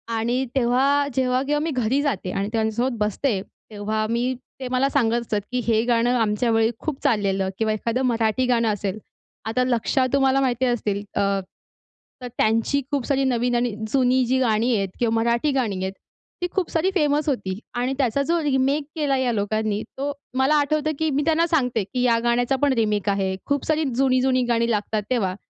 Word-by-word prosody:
आणि 240 +4 0
तेव्हा 270 +3 +2
जेव्हा 255 0 +1
केव्हा 295 +1 0
मी 330 - -1
घरी 255 +2 +1
जाते 195 -10 -2
आणि 200 +1 -2
त्यांच्यासोबत 230 +3 0
बसते 210 0 0
तेव्हा 215 +1 -5
मी 240 +2 0 0.3
ते 260 - -4
मला 265 +2 +2
सांगत 240 -4 +2
असतात, 210 -3 -2
की 250 - 0
हे 225 -1 +2
गाणं 240 0 +2
आमच्या 225 +2 +1
वेळी 225 +1 +3
खूप 310 -4 -3
चाललेलं 195 -3 +1
किंवा 220 -1 +1
एखादं 230 +4 -1
मराठी 230 +1 +1
गाणं 235 -2 +2
असेल. 205 -1 -2 0.5
आता 250 +3 0
लक्षा 255 +1 +1
तुम्हाला 270 -1 +3
माहिती 255 -1 +1
असतील 210 -5 -1
अ, - - +1 1.0
तर 250 - -5
त्यांची 230 +6 +2
खूप 275 -4 -1
सारी 275 -1 +1
नवीन 245 -1 +1
आणि 240 -3 0 0.2
जुनी 255 -1 +3
जी 260 +2 +1
गाणी 235 0 +2
आहेत 195 -2 -1
किंवा 230 -2 +1
मराठी 235 +5 +1
गाणी 245 -7 0
आहेत 190 +1 -3 0.5
ती 355 - 0
खूप 380 -3 0
सारी 330 +3 +1
फेमस 300 -2 +2
होती 195 -6 -2 0.2
आणि 250 +2 0
त्याचा 275 0 +1
जो 335 +2 +1
रिमेक 275 +1 +1
केला 285 -3 +1
या 255 -2 +1
लोकांनी 215 0 -1 0.2
तो 280 +2 -2 0.3
मला 270 +3 +3
आठवतं 305 +1 +1
की 315 -1 +1
मी 285 +1 +1
त्यांना 330 +1 +3
सांगते 250 -9 +1
की 250 +6 -4
ह्या 235 -2 +3
गाण्याचा 245 +2 +2
पण 285 -2 +3
रिमेक 210 -3 0
आहे. 190 -1 0
खूप 285 -1 -1
सारी 315 0 +1
जुनी-जुनी 255 -1 +2
गाणी 235 0 +2
लागतात 210 0 -1
तेव्हा 195 -7 0
245 Hz, 185 wpm, -23 LUFS, 220-270 Hz, 1.0 s, वेळी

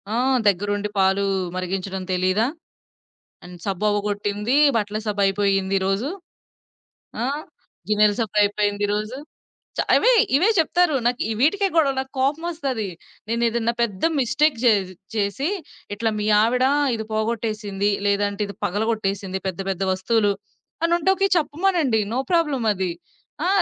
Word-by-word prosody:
ఆహ్, 255 +2 +2
దగ్గరుండి 205 +2 -1
పాలు 195 +1 +3 0.3
మరిగించడం 190 +1 -3
తెలీదా? 185 +5 +2 1.0
అండ్ 175 0 -10
సబ్బవ్వగొట్టింది, 205 +3 -1 0.2
బట్టల 210 0 -2
సబ్బు 205 -1 -1
అయిపోయింది 195 0 +1
ఈరోజు. 195 - -1 1.1
ఆ! - - 0 0.7
గిన్నెల 210 0 +4
సబయిపేంది 205 -1 +1
ఈరోజు." 215 +4 -2 0.6
చ - - -3 0.2
అవే - - +5 0.2
ఇవే 360 +9 +4
చెప్తారు 330 -1 +2
నాకు 245 0 +1 0.2
వీటికే 390 +8 +3
గొడవలు 275 -5 +3
నాకోపమొస్తది. 270 - -2 0.4
నేనేదైనా 235 0 0
పెద్ద 200 -5 -4 0.2
మిస్టేక్ 295 +3 +2
జే 240 - +6 0.4
చేసి 215 - -1 0.5
ఇట్లా 225 +1 0
మీ 210 - -2 0.2
ఆవిడ 250 +3 +2 0.3
ఇది 220 -1 -5
పోగొట్టేసింది, 215 -2 -1 0.2
లేదంటే 205 0 0
ఇది 200 - -9
పగలగొట్టేసింది, 200 -2 -1
పెద్ద 185 0 -4
పెద్ద 190 +1 -3
వస్తువులు. 205 +2 +1 0.5
అనుంటే 345 +3 +2 0.2
చెప్పమనండి. 310 - +1
నో 255 - 0
ప్రాబ్లమ్ 295 -8 +1
అది. 185 -2 -2 0.5
ఆ! - - +2
215 Hz, 115 wpm, -22 LUFS, 200-260 Hz, 1.1 s, జే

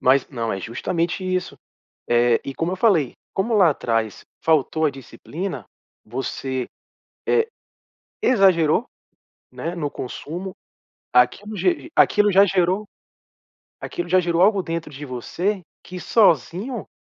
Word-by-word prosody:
Mas 130 +1 +3
não, 115 -5 -3
é 95 - -3
justamente 170 - -2
isso, 185 0 -2 0.5
eh, 120 0 +3
e 135 - -4
como 165 +5 -2
eu 190 - -2
falei, 180 - +3 0.2
como 225 +4 0
lá 185 -6 +6
atrás 115 -6 -2 0.2
faltou 160 0 +2
a 150 - +3
disciplina, 160 +7 -7 0.4
você, 130 +2 -3 0.6
eh, 455 -1 +3 0.7
exagerou, 190 -4 +4 0.7
né? 170 +2 -5
No 150 -4 -3
consumo, 175 +9 -6 0.6
aquilo 160 - +2
ge 345 - 0
aquilo 210 -1 +4
já 195 +2 +7
gerou 185 +2 +1 1.0
aquilo 175 0 -5
já 185 +1 +4
gerou 170 0 +1
algo 200 -1 +4
dentro 165 -2 -4
de 145 +2 -8
você, 175 - -2 0.2
que 180 0 -8
sozinho, 200 - +2
170 Hz, 125 wpm, -22 LUFS, 135-195 Hz, 1.0 s, já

